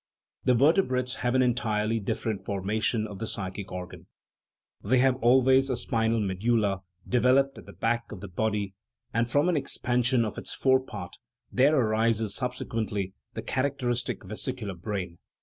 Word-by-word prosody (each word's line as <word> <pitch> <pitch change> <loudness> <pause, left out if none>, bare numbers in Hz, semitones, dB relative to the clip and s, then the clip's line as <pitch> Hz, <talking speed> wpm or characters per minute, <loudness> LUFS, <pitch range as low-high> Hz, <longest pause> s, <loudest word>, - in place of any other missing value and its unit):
The 125 0 +5
vertebrates 130 -3 +2
have 125 +1 0
an 130 - +5
entirely 115 -3 +1
dif 100 - -3
ferent 110 -4 -2
formation 105 +3 0
of 100 -3 -8
the 115 - -3
psychic 95 -1 -5
organ; 90 0 -7 0.8
they 125 +6 +3
have 130 0 +3
al 125 +2 +5
ways 130 +1 +4
a 130 - 0
spinal 115 -1 0
medulla 100 0 +1 0.3
developed 130 +3 +3
at - - -14
the - - -11
back 120 +1 -1
of 105 - -7
the 100 - -7
body; 105 +1 -1 0.4
and 115 +2 +1
from 145 +6 +3
an 180 - +2
expansion 125 -3 +1
of 105 - -4
its - - -3
fore 130 -1 +4
part 100 -9 -8 0.3
there 140 +4 +4
arises 110 -2 +2
subsequently 110 -5 -2 0.2
the - - -4
characteristic 130 -4 -1
vesicular 105 +1 -4
brain. 90 -1 -5
115 Hz, 160 wpm, -28 LUFS, 105-125 Hz, 0.8 s, The